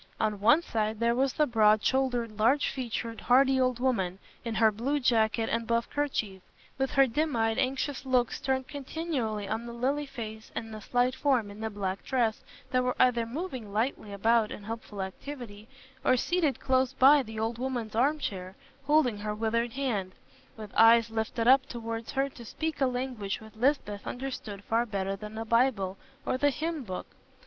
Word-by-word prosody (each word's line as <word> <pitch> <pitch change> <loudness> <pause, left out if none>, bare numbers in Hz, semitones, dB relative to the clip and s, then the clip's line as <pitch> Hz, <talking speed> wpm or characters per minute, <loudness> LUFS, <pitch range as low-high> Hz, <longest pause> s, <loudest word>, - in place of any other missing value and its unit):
On 215 -2 0
one 285 +11 +5
side 215 -4 -2
there 235 0 +3
was 260 +2 +1
the 300 - +3
broad 215 -4 +4
shouldered, 245 -5 0
large 255 +7 +3
featured, 230 -3 -4
hardy 265 +1 +4
old 255 -1 +1
woman, 195 -8 0 0.3
in 230 -2 -3
her 220 0 +5
blue 260 +8 -1
jacket 225 -3 +2
and 230 0 -1
buff 235 0 +1
kerchief, 220 -10 -2 0.4
with 270 0 +1
her 275 +1 +5
dim 295 +4 -1
eyed 225 -1 +1
anxious 270 +1 -1
looks 255 -3 +1
turned 265 -2 -1
continually 265 -8 -3
on 225 +3 -3
the 235 - -7
lily 275 +5 -1
face 220 -4 -8
and 225 -1 -5
the 215 - -7
slight 245 +4 +1
form 250 -9 +1
in 205 - -11
the 220 0 -2
black 195 -2 -4
dress 235 -5 0 0.3
that 255 -1 +2
were 250 0 0
either 235 -2 +3
moving 255 - -5
lightly 215 0 -1
about 220 +2 +2
in 205 - -7
helpful 215 -2 -5
activity, 215 0 -8 0.4
or 255 - +4
seated 325 0 +1
close 260 -1 +1
by 275 +3 +6
the 220 -3 -7
old 225 +1 -2
woman's 245 -4 -3
arm 275 +7 +2
chair, 190 -8 -5 0.3
holding 290 -8 +3
her 210 0 -3
withered 225 +2 0
hand, 215 -9 -2 0.4
with 215 -2 -9
eyes 230 0 +6
lifted 225 +1 -1
up 260 +1 +6
towards 230 -1 -5
her 270 +1 +1
to 255 -3 -12
speak 315 +7 -4
a 265 - +5
language 250 -6 -3
which 220 0 -14
Lisbeth 220 -4 0
understood 245 -6 -5
far 230 +3 +1
better 195 -4 -2
than 210 +2 -9
the 225 +1 -4
Bible 225 -5 +2 0.3
or 255 - -1
the 290 - +4
hymn 315 +1 -3
book. 185 -5 -5
235 Hz, 185 wpm, -29 LUFS, 215-265 Hz, 0.4 s, by